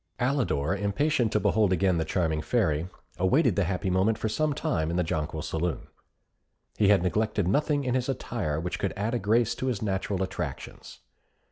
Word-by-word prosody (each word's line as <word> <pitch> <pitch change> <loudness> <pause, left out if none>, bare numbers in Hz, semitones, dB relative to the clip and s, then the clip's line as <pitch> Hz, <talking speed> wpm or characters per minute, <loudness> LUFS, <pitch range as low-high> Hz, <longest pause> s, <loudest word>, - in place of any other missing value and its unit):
Alidor, 120 - 0
impatient 110 +5 +1
to 105 - +2
behold 105 -2 +2
again 95 -1 +2
the 80 - 0
charming 80 -2 0
Fairy, 85 -6 0 0.3
awaited 115 - +3
the 100 - +2
happy 95 +1 -1
moment 95 +4 +2
for - - -2
some 155 +7 0
time 80 - -1
in 85 - -2
the 90 - +2
Jonquil 80 -1 -3
Saloon. 85 +1 -2 0.9
He 105 - +2
had 100 -3 +5
neglected 105 +1 0
nothing 145 +7 +1
in 125 -2 -1
his 130 0 0
attire 105 - -2
which 85 +2 -4
could 95 - -1
add 105 +4 -1
a 120 - 0
grace 115 +3 +2
to 130 - -4
his 115 -5 -1
natural 95 -1 -1
attractions. 95 - -6
100 Hz, 180 wpm, -27 LUFS, 90-120 Hz, 0.9 s, had